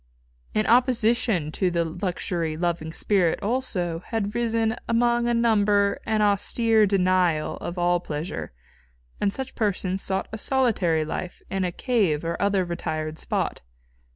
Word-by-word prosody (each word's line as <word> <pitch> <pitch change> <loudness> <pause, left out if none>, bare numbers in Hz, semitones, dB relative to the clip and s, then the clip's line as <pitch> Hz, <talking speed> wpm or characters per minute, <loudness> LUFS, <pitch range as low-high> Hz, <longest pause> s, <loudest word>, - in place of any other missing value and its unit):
In 215 - +2
opposition 230 - +2
to 185 +3 0
the 170 -1 0
luxury 170 -1 -2
loving 170 -2 -1
spirit, 180 -1 +1
also, 200 -8 -1
had 210 -3 -2
risen 225 -1 0
among 240 +1 +2
a 240 - +2
number 205 -3 +2
an 215 -1 +2
austere 215 +2 +3
denial 185 -5 +2
of 175 - -6
all 175 0 +2
pleasure, 155 - -5 0.7
and 200 - +1
such 265 +5 -5
persons 195 -3 -1
sought 190 0 -1
a 220 - -4
solitary 200 - +1
life 175 +3 -5
in 195 -1 0
a 180 - -1
cave 185 - 0
or 170 0 -1
other 200 -2 +2
retired 155 -2 -4
spot. - - -2
195 Hz, 140 wpm, -25 LUFS, 170-225 Hz, 0.7 s, austere